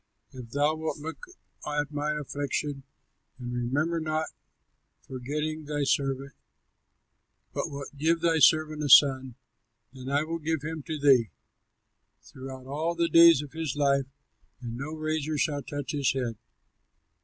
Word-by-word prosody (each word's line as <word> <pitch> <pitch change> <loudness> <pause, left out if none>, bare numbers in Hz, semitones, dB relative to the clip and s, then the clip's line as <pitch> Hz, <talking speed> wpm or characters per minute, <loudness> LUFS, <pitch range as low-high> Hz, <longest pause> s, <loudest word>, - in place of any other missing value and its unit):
If 125 -3 -9
thou 145 +5 +1
wilt 160 0 -3
look 160 +2 -8 0.4
at 150 -1 -2
my 150 +1 -1
affliction, 145 -1 -3 0.6
And 125 -1 -6
remember, 145 +8 0
not 155 0 -2 0.7
forgetting 150 +4 -4
thy 145 0 -2
servant, 135 0 0 1.2
But - - -2
wilt 140 0 -8
give 160 +4 +1
thy 165 -1 +2
servant 155 0 +4
a 145 - -1
son, 130 -3 +6 0.6
Then 130 0 -8
I 145 +2 +2
will 165 +1 -4
give 160 -1 -2
him 160 0 -4
to 155 - -3
thee, 135 -6 +4 0.9
Throughout 130 0 -10
all 155 +5 -2
the 170 0 +1
days 165 -3 +7
of 145 - -10
his 160 -4 -3
life; 140 -2 +2 0.5
And 120 -2 -6
no 140 +5 -5
razor 155 -1 -2
shall 145 -1 0
touch 145 -1 -5
his 140 -3 +1
head." 125 -4 -2
145 Hz, 145 wpm, -28 LUFS, 135-155 Hz, 1.2 s, days